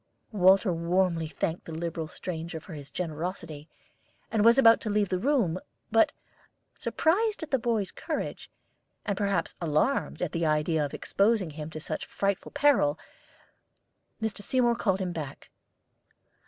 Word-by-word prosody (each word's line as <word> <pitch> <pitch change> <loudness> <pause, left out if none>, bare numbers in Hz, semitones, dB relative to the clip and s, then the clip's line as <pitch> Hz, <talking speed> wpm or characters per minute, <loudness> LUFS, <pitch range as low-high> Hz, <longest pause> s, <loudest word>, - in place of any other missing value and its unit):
Walter 190 -1 +5
warmly 170 0 +1
thanked 160 +2 -3
the - - -8
liberal 160 0 -3
stranger 165 0 -5
for 160 +2 -11
his 145 -2 -8
generosity, 160 -2 -5 0.6
and 220 -2 +2
was 230 +3 +7
about 230 -4 +7
to 215 - -3
leave 205 -2 +1
the 185 - 0
room; 225 - +1 0.3
but, 225 0 +5 0.6
surprised 410 +4 +1
at 315 - -7
the 265 - +3
boy's 225 -5 0
courage, - - -4 0.6
and 200 -1 0
perhaps 200 -1 0
alarmed 170 - 0
at 170 - -2
the 165 +1 -2
idea 155 0 +2
of 145 - -4
exposing 200 -4 +1
him 150 +1 -6
to 155 - -7
such 155 - -4
frightful 200 -1 -1
peril, 240 - +3 1.2
Mr. 220 -2 -3
Seymour 240 +2 +2
called 195 -4 0
him 185 -1 -2
back. 150 -5 -7
185 Hz, 145 wpm, -28 LUFS, 160-220 Hz, 1.2 s, was